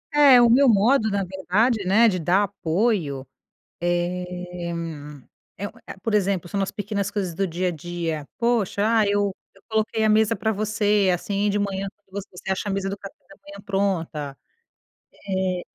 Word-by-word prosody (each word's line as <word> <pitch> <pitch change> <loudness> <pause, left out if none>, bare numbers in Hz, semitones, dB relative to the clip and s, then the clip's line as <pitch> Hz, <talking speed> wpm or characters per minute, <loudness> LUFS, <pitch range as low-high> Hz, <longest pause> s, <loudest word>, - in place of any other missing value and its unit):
É, 280 -4 +8
o 240 - +6
meu 255 +3 +5
modo 220 +2 +4
na 200 -1 0
verdade, 195 +4 0
né, 215 +5 +5
de 185 -4 +1
dar 180 +5 +3
apoio, 175 - -1 0.6
eh, 180 0 -2 0.9
é 200 +2 -3
um - - -11 0.2
é - - -6
a 190 - -19
por 225 - -1
exemplo 195 -4 +1
são 200 +3 -3
nas 195 - 0
pequenas 205 -1 -3
coisas 190 -5 -3
do 195 +3 -1
dia 180 +2 -1
a - - -2
dia: 165 -2 -4
"Poxa, 215 -4 +1
ah, 225 -2 +3
eu 200 -1 +1 0.2
eu 195 - -21
coloquei 220 0 0
a 215 - +3
mesa 215 0 +3
pra 220 +3 0
você, 210 -1 +1
assim, 200 +3 0
de 205 - 0
manhã, 195 -1 -2
quando 200 0 -8
você - - -16
você 180 +1 -5
acha 190 +2 -2
a - - 0
mesa 195 0 -1
do 200 - -4
café 200 0 -10
da 195 - -15
manhã 200 0 -11
pronta". 165 -8 -2 0.9
Eh, 185 -2 -1
195 Hz, 185 wpm, -24 LUFS, 180-210 Hz, 0.9 s, É